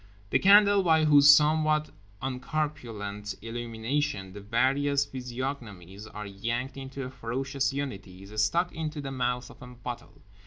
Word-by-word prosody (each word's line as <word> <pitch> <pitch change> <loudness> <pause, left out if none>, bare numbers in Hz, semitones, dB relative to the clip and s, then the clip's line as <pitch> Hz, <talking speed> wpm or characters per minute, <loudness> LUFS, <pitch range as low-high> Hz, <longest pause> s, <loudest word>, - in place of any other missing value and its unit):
The - - +4
candle 200 0 +6
by 160 -3 +3
whose 145 -1 +7
somewhat 155 +1 +4 0.3
uncorpulent 125 -7 -4
illumination 115 -1 -3
the 100 - -9
various 135 +6 +1
physiognomies 120 -7 -6
are 105 -1 -8
yanked 115 +7 -3
into 135 0 -7
a 130 - -6
ferocious 130 +2 -2
unity 100 -10 -6
is 105 +2 -1
stuck 175 +11 +1
into 155 -2 -4
the 140 -1 -5
mouth 125 -1 -2
of - - -18
a 125 - -9
bottle. 125 -1 -9
130 Hz, 140 wpm, -28 LUFS, 110-145 Hz, 0.3 s, whose